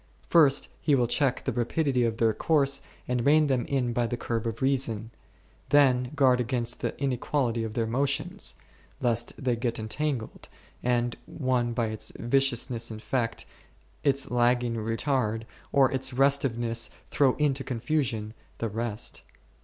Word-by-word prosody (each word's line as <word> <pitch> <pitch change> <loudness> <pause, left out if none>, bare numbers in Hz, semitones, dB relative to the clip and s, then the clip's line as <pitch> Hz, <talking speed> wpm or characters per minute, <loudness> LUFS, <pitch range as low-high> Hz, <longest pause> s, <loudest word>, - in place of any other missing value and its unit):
First 145 -5 +5
he 145 - +3
will 125 -2 +3
check 130 +2 +1
the - - -1
rapidity 125 +1 +1
of 115 -1 -1
their 115 -1 +3
course 140 +2 +2 0.3
and 125 -1 0
rein 155 +3 +5
them 130 -4 0
in 125 -4 0
by 120 0 +1
the 120 - -3
curb 115 -1 -2
of 115 - -4
reason; 120 -5 0 0.6
then 130 -3 +4
guard 130 -3 +4
against 120 -1 -1
the - - -3
in 140 -1 0
equality 125 -2 -1
of 110 0 -5
their 115 -2 +1
motions, 140 - -1 0.4
lest 120 -3 0
they 125 -2 0
get 115 0 -2
entangled, 120 +2 -3 0.3
and 120 -1 0
one 125 -3 0
by 115 0 0
its 110 -1 -4
viciousness 120 -2 +1
infect, 115 +1 -2 0.6
its 140 -1 +1
lagging 120 0 +2
retard, 115 0 0 0.3
or 135 -2 +4
its 130 0 0
restiveness 120 -4 +1 0.2
throw 135 -3 +2
into 140 -2 +1
confusion, 120 -3 -1 0.2
the 115 - -2
rest. 115 0 -3
125 Hz, 145 wpm, -27 LUFS, 115-135 Hz, 0.6 s, First